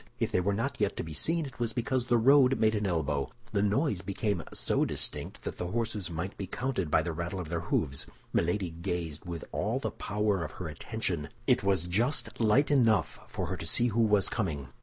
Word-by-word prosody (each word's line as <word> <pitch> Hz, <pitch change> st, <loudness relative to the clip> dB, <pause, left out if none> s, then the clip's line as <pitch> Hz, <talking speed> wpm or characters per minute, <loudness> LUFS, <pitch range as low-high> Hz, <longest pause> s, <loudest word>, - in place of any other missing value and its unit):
If -, -, 0 dB
they 90 Hz, -, +2 dB
were 100 Hz, +3 st, +1 dB
not 115 Hz, +2 st, -2 dB
yet 105 Hz, -, +1 dB
to -, -, -2 dB
be 80 Hz, -1 st, -7 dB
seen, 165 Hz, -, +2 dB
it 135 Hz, -2 st, -10 dB
was 115 Hz, -2 st, -1 dB
because 125 Hz, +1 st, -1 dB
the 120 Hz, -, +4 dB
road 135 Hz, +2 st, +5 dB
made 110 Hz, 0 st, +4 dB
an 105 Hz, -2 st, 0 dB
elbow. 75 Hz, -5 st, 0 dB, 0.2 s
The 100 Hz, -, +1 dB
noise 105 Hz, -, +1 dB
became 100 Hz, -1 st, -1 dB
so -, -, +1 dB
distinct -, -, -2 dB
that -, -, -5 dB
the 90 Hz, -, -3 dB
horses 105 Hz, -2 st, -2 dB
might 85 Hz, +4 st, -4 dB
be 100 Hz, -, -4 dB
counted 120 Hz, -, -2 dB
by 80 Hz, -, +3 dB
the 85 Hz, -, -2 dB
rattle 85 Hz, +3 st, -3 dB
of 85 Hz, -4 st, -5 dB
their 85 Hz, 0 st, -1 dB
hoofs. 70 Hz, -4 st, -1 dB, 0.3 s
Milady 90 Hz, +1 st, +1 dB
gazed 85 Hz, -1 st, -4 dB
with 85 Hz, -2 st, -5 dB
all -, -, 0 dB
the -, -, -2 dB
power 105 Hz, -3 st, 0 dB
of 75 Hz, -, -6 dB
her 90 Hz, -, -5 dB
attention; 85 Hz, 0 st, -3 dB, 0.2 s
it -, -, +4 dB
was 95 Hz, -4 st, +3 dB
just 110 Hz, -, 0 dB
light 120 Hz, +7 st, +4 dB
enough 115 Hz, -7 st, +3 dB
for -, -, -3 dB
her -, -, -3 dB
to -, -, -6 dB
see 120 Hz, 0 st, +3 dB
who 115 Hz, +2 st, +1 dB
was 105 Hz, -3 st, +4 dB
coming. 75 Hz, -, -2 dB
100 Hz, 220 wpm, -30 LUFS, 85-115 Hz, 0.3 s, road